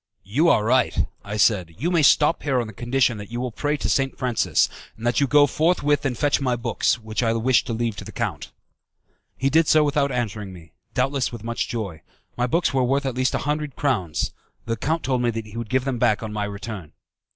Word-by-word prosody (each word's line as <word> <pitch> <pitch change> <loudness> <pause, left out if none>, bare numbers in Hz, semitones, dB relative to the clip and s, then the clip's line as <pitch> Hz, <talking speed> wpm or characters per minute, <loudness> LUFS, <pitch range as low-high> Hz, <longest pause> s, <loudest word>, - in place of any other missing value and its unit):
"You 140 - +2
are 105 - +4
right," 125 +2 +2 0.2
I 105 +1 -5
said, 95 -6 +2
"you 165 - -1
may 170 -3 +3
stop 150 +3 +4
here 135 -4 +1
on 120 - -1
the 110 - -9
condition 120 0 +1
that 105 - -8
you 120 +1 -4
will 125 -1 -3
pray 145 +6 -1
to - - -2
St. 135 -1 0
Francis; 125 -3 +2 0.3
and 115 - -8
that 120 +3 +2
you 140 - +3
go 145 +1 +6
forthwith 145 -1 +1
and 125 -3 -3
fetch 145 -2 +1
my 125 -2 +1
books, 120 0 0
which 110 -1 -4
I 115 -2 +2
wish 115 +2 +3
to 125 - -4
leave 115 -1 -1
to - - -6
the - - -9
count." - - -4 0.9
He 135 +1 0
did 160 +1 +4
so 155 -1 +5
without 145 -1 +1
answering 105 -5 -3
me, 80 -3 -14 0.2
doubtless 135 0 0
with 120 -3 -8
much 115 0 -2
joy. 100 -10 -5 0.3
My 125 0 0
books 165 +2 +1
were 130 -1 +2
worth 135 +3 +1
at 135 - -1
least 130 +1 0
a - - -3
hundred 150 -2 -2
crowns. 105 - -1 0.3
The 115 - -1
count 160 +8 -1
told 130 -2 0
me 120 - +2
that 115 -1 -3
he 105 0 -12
would 115 -2 -5
give 130 +2 +1
them 130 -3 -2
back 115 -2 +2
on 110 -1 -5
my 105 -1 -1
return. 100 -4 -7
125 Hz, 235 wpm, -23 LUFS, 110-140 Hz, 0.9 s, go